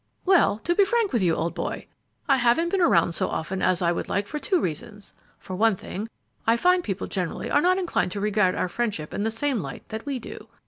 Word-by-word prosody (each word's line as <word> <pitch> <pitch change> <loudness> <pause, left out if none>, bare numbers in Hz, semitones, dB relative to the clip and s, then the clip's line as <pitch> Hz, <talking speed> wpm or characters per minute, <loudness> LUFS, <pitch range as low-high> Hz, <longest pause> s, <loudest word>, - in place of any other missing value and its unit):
"Well, 365 - +4
to 345 - +1
be 400 - +5
frank 440 +1 +1
with 235 - +2
you, 170 -3 +2
old 165 +1 -2
boy, - - -4 0.4
I 275 -2 +4
haven't 250 +8 +2
been 385 +1 0
around 335 - +4
so 165 - 0
often 185 +4 -3
as 180 -1 +2
I 170 - +3
would 175 - -3
like 200 +1 0
for 300 +8 -5
two 365 +5 +1
reasons; 205 - -5 0.2
for 185 - -7
one 220 +2 +3
thing, 205 +4 -6 0.4
I 230 +1 +4
find 360 +6 +3
people 195 - -3
generally 180 -4 -3
are 290 - +4
not 365 +2 +3
inclined 355 - 0
to 205 - -4
regard 210 -2 +2
our - - 0
friendship 200 -7 -3
in - - -2
the 220 - +1
same 250 +2 -1
light 135 -7 -7
that 220 +4 -6
we 275 -2 -1
do. 220 -2 -9
220 Hz, 235 wpm, -25 LUFS, 185-300 Hz, 0.4 s, be